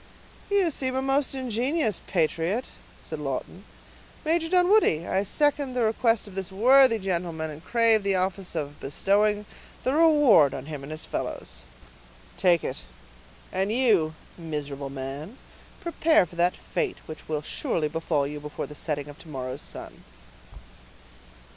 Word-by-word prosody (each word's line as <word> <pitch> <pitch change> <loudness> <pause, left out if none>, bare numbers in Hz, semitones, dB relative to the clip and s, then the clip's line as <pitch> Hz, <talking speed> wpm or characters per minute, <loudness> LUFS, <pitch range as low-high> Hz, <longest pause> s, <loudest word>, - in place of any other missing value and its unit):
"You 395 -4 +3
seem 260 -2 -2
a 265 - +1
most 270 0 +1
ingenious 255 - 0
patriot," 170 +6 0 0.4
said 155 - -6
Lawton. 150 +7 -5 0.6
"Major 325 +1 +1
Dunwoodie, 360 - +4
I 190 - +1
second 285 +4 0
the 245 - +1
request 225 0 +2
of 200 - -11
this 190 -1 -4
worthy 250 +4 +6
gentleman, 170 -5 -2
and 150 +2 -10
crave 230 +1 +4
the 195 -1 +1
office 185 0 -2
of 145 -2 -4
bestowing 205 +8 +1 0.4
the 260 - +1
reward 295 - +5
on 130 - -6
him 150 -2 -6
and 140 +2 -8
his 155 - -4
fellows." - - -5 0.7
"Take 175 -4 +3
it; - - -4 0.7
and 190 +2 0
you, 210 -11 +3 0.2
miserable 145 -4 -5
man, 140 - -6 0.4
prepare 330 - +3
for 175 - -15
that 175 +1 +2
fate 430 -6 -2
which 155 - -10
will 150 -1 -2
surely 155 +1 -1
befall 155 -2 -1
you 150 +1 -5
before 150 0 -5
the - - -10
setting 145 -1 -3
of 145 0 -11
to - - -14
morrow's 130 -1 -5
sun." - - -8
190 Hz, 145 wpm, -26 LUFS, 155-255 Hz, 0.7 s, worthy